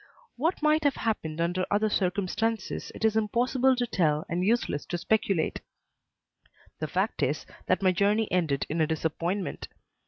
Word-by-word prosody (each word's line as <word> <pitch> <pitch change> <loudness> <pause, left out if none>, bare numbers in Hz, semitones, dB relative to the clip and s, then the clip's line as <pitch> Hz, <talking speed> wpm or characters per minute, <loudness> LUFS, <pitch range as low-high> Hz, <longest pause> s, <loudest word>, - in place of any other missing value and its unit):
What 315 +5 -1
might 305 +1 +3
have 285 -2 +3
happened 165 -8 -2
under 175 +2 0
other 210 +2 +2
circumstances 205 +2 -1
it - - -2
is 220 -1 +3
impossible 245 +4 +2
to 245 -1 0
tell 160 -9 +1
and 175 +2 -1
useless 210 -8 +1
to 175 - -2
speculate; 195 -3 0 1.2
the - - -2
fact - - -1
is - - 0 0.2
that - - +1
my 185 - +5
journey 205 +4 +2
ended 160 -7 +1
in 160 +2 -1
a 155 - +3
disappointment. 165 +4 -2
200 Hz, 155 wpm, -28 LUFS, 170-225 Hz, 1.2 s, my